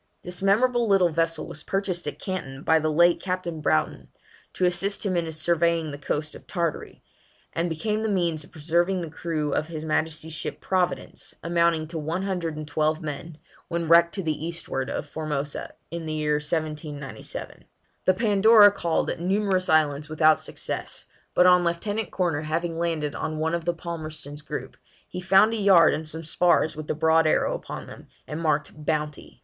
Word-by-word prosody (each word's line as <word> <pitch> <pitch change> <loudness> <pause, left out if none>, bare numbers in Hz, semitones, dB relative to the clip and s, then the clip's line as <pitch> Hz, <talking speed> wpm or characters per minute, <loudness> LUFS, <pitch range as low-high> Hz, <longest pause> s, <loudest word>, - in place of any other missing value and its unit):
This 180 +1 -5
memorable 235 +4 +3
little 195 -3 +4
vessel 165 0 0
was 150 - -8
purchased 190 -2 -2
at - - -3
Canton 145 -8 -5
by 160 0 +4
the 155 0 0
late 170 +3 +4
Captain 180 -4 -3
Broughton, 75 - 0 0.5
to 185 - +1
assist 195 +4 +1
him 190 -2 0
in 165 -2 -1
surveying 165 0 +1
the 145 - -7
coast 150 +1 -3
of - - -13
Tartary, 170 -4 -3 0.5
and 170 +1 0
became 210 +7 -1
the 220 - -1
means 170 -6 0
of - - -17
preserving 170 +4 0
the 165 -3 -6
crew 155 -3 -2
of 155 - 0
his 160 -2 -6
Majesty's 160 0 -1
ship 155 - -4
Providence, 180 -1 -2
amounting 170 -1 +2
to 165 0 -5
one 165 +5 -2
hundred 175 -5 -2
and 155 -1 -6
twelve 155 +1 0
men, 150 +1 -6 0.3
when 170 -1 -2
wrecked 170 +1 +5
to 195 - -2
the 155 -1 -2
eastward 160 -5 -3
of - - -3
Formosa, 150 -1 -4 0.2
in 170 -1 -5
the 155 - -2
year 150 -1 +1
1797. 150 -4 -5 0.4
The 185 - +5
Pandora 210 0 +6
called 170 -5 0
at - - -5
numerous 190 +1 +1
islands 150 -1 +2
without 155 0 +4
success, - - -6 0.3
but 180 - +6
on 180 -1 +6
Lieutenant 205 +6 -1
Corner 170 -6 0
having 165 +2 -2
landed 160 -4 -1
on 155 0 -3
one 160 +1 -1
of 170 -1 -2
the 175 - +1
Palmerston's 155 -3 -6
group, - - -6 0.3
he 180 - -6
found 195 +4 +5
a - - 0
yard 190 -6 +6
and 155 0 -4
some 160 +1 -5
spars 170 0 +2
with 155 0 -7
the - - -1
broad 160 +1 +3
arrow - - +2
upon - - -6
them, - - -12 0.2
and 150 +2 -5
marked 150 -2 0
Bounty. 150 -1 -3
165 Hz, 180 wpm, -25 LUFS, 155-180 Hz, 0.5 s, Pandora